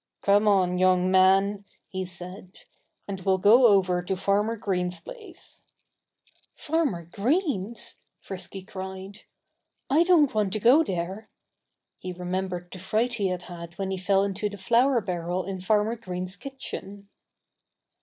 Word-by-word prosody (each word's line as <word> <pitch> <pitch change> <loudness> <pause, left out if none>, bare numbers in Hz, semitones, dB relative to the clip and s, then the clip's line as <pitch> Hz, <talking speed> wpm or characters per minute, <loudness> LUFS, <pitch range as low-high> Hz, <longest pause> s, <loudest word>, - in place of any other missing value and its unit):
"Come 205 +2 +4
on, 185 -3 +3
young 185 0 +3
man!" 195 +2 +4 0.2
he 190 -1 -4
said, 180 +1 -7 0.5
"and 195 -2 -5
we'll 190 0 +2
go 230 +6 +6
over 185 -4 +3
to 185 +2 -2
Farmer 205 +4 +1
Green's 180 -4 -2
place." - - -11 0.9
"Farmer 290 - -1
Green's!" 230 - -1 0.2
Frisky 190 0 -7
cried. 190 0 -8 0.7
"I 310 +4 +5
don't 340 -6 +4
want 210 -3 0
to 215 - 0
go 255 +9 +6
there." 190 - -4 0.7
He 185 - -6
remembered 180 0 -4
the 185 - -8
fright 220 +6 0
he 205 -5 0
had 180 -1 -3
had 170 -1 -10
when 195 -1 -3
he 190 - -2
fell 195 +1 +2
into 200 +1 -2
the 205 - -9
flour 235 +6 +3
barrel 180 -1 -3
in 190 0 -5
Farmer 210 +4 +1
Green's 185 -3 -5
kitchen. 200 -7 -8
195 Hz, 140 wpm, -26 LUFS, 185-215 Hz, 0.9 s, go